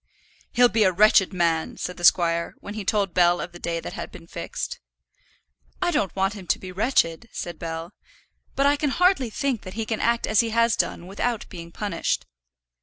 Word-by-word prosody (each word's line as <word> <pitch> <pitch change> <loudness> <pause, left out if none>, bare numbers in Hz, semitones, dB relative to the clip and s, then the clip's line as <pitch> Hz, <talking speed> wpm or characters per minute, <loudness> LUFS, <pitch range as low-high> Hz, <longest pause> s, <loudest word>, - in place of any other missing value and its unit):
"He'll 245 0 +6
be 225 -2 +2
a 190 - +4
wretched 200 0 +5
man," 170 -3 0
said 180 - -5
the 175 - -9
squire, 170 -1 +3
when 205 - -8
he 215 -1 -5
told 195 -2 0
Bell 175 -1 +4
of 180 - -5
the 175 - -12
day 170 -1 -2
that - - -7
had - - -6
been - - -12
fixed. - - -5 1.0
"I 355 -1 +1
don't 200 - 0
want 195 +1 +1
him 195 -4 -10
to - - +2
be 185 - -9
wretched," 195 -1 +1
said 175 - -6
Bell. 165 +2 -5 0.6
"But 275 - +2
I 285 +1 +4
can 295 0 0
hardly 360 -4 +3
think 260 -1 -1
that 185 0 -9
he 225 0 -2
can 220 0 -2
act 235 0 +1
as 215 - +2
he 230 - +3
has 230 0 +3
done 170 - -1
without 210 +4 -2
being 170 -2 -9
punished." 200 -2 -2
200 Hz, 205 wpm, -24 LUFS, 175-230 Hz, 1.0 s, He'll